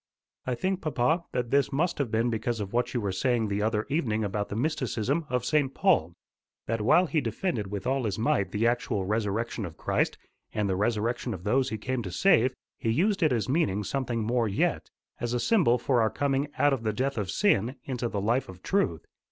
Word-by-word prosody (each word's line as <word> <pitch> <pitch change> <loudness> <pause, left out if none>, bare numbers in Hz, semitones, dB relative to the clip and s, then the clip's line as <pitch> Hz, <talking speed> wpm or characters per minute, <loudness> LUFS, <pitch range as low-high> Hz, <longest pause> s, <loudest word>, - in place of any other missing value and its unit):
"I 125 - 0
think, 190 +6 -1
papa, 155 +3 +1
that 125 -1 -2
this 140 0 +3
must 165 +5 0
have 140 -5 0
been 115 +2 +1
because 115 +1 -2
of 100 0 -5
what 120 +1 +1
you - - +2
were 100 -3 -1
saying 115 +2 0
the 100 +1 -1
other 110 0 0
evening 125 -8 0
about 100 0 -2
the - - -4
mysticism 140 +2 -1
of 125 -1 -1
St. 140 -2 +1
Paul; 125 - +2 0.5
that 115 0 -1
while 155 +11 +5
he 155 -1 0
defended 115 - -2
with 100 -1 -5
all 130 -1 0
his 105 -2 -1
might 110 -3 +1
the 105 +3 0
actual 115 -5 0
resurrection 110 +2 -1
of 85 -4 -7
Christ - - 0 0.4
and 105 -2 +1
the 95 - 0
resurrection 115 +3 -1
of 90 - -11
those 130 +6 +2
he 110 - -3
came 130 +3 -2
to 100 - -5
save, 130 - +3 0.2
he 115 - -1
used 190 - +2
it 155 -4 +4
as 115 -3 0
meaning 130 - +1
something 120 0 -2
more 115 +1 +1
yet, 100 - 0 0.3
as 120 +1 -2
a - - +1
symbol 175 - +3
for 120 0 +1
our 110 - +3
coming 140 +2 0
out 145 -1 +4
of 130 - -1
the 110 -1 -1
death 130 +2 -1
of 100 -3 -3
sin 130 - +2
into 125 -3 -3
the 105 - -2
life 115 +5 0
of 95 0 -11
truth. 140 - 0
120 Hz, 215 wpm, -28 LUFS, 105-135 Hz, 0.5 s, while